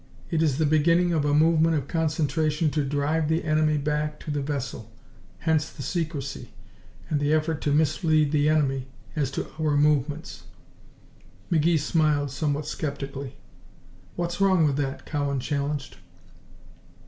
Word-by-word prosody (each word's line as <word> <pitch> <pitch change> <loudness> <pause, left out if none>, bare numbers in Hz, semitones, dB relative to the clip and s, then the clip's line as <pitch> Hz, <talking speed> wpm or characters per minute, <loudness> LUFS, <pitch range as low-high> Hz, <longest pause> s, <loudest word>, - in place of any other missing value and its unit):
It 160 -2 +1
is 150 -5 +2
the 160 - +2
beginning 170 +4 +3
of 155 -3 +1
a 145 - +2
movement 160 +1 +4
of 140 -3 -2
concentration 155 -1 0
to 150 -1 0
drive 145 +3 0
the 160 +1 +1
enemy 155 -1 +2
back 150 +1 -1
beyond 150 - -3
the 145 - -1
Vesle. 130 -6 -4 0.5
Hence 160 -2 +1
the 140 - -9
secrecy, 145 -4 -4 0.5
and 150 - 0
the 145 +1 +1
effort 155 0 +1
to 145 - 0
mislead 155 0 +2
the 150 0 +3
enemy 135 -4 +1 0.3
as 145 -4 0
to 135 - -3
our 150 -2 +1
movements." 150 +1 0 1.1
McGee 165 0 +3
smiled, 150 -2 +1
somewhat 145 +1 -1
skeptically. 140 -3 -5 0.8
"What's 175 +2 -3
wrong 190 -4 +4
with 140 -2 +1
that?" 135 -2 -3
Cowan 140 -2 -1
challenged. 140 - -3
150 Hz, 145 wpm, -26 LUFS, 145-160 Hz, 1.1 s, movement